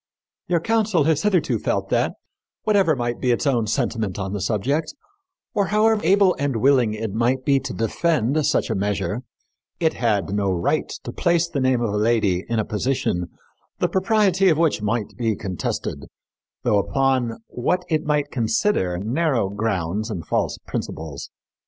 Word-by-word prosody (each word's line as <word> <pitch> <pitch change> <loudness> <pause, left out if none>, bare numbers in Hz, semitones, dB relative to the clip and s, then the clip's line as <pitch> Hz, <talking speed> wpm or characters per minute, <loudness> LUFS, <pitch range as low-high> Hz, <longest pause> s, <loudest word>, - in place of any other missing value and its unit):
Your 175 -2 +2
council 215 -4 +2
has 155 0 +2
hitherto 175 - +1
felt - - -1
that, - - +1 0.5
whatever 195 -7 +3
might 120 -2 -2
be 125 - +1
its 120 - +1
own 120 -6 +1
sentiment 110 -5 -1
on 100 -1 -3
the 100 - -3
subject, 135 - -1 0.6
or 200 -2 +1
however 215 0 +3
able 195 -1 +4
and 140 -2 0
willing 125 -2 +3
it 110 -2 -4
might 125 +3 0
be 140 -1 +4
to - - -6
defend 145 +4 0
such - - +1
a - - 0
measure, 100 +3 -1 0.6
it 160 -2 +2
had 105 -5 0
no 100 -1 +1
right 95 - 0
to - - -5
place 170 -1 +1
the 160 -4 -3
name 130 -2 +2
of 105 -3 -1
a - - 0
lady 105 -4 +2
in 115 - 0
a 110 - +1
position 105 -6 -1 0.5
the - - +1
propriety 190 0 +3
of 160 - +3
which 160 -9 +2
might 105 -1 -2
be 115 -3 +1
contested, 95 -3 -4 0.6
though 105 - +3
upon 130 +1 0
what 180 +9 -1
it 155 -2 0
might 150 -1 0
consider 110 - +1
narrow 120 - 0
grounds 100 0 -2
and 90 -7 -5
false - - -1
principles. 75 -4 -5
120 Hz, 165 wpm, -22 LUFS, 105-160 Hz, 0.6 s, able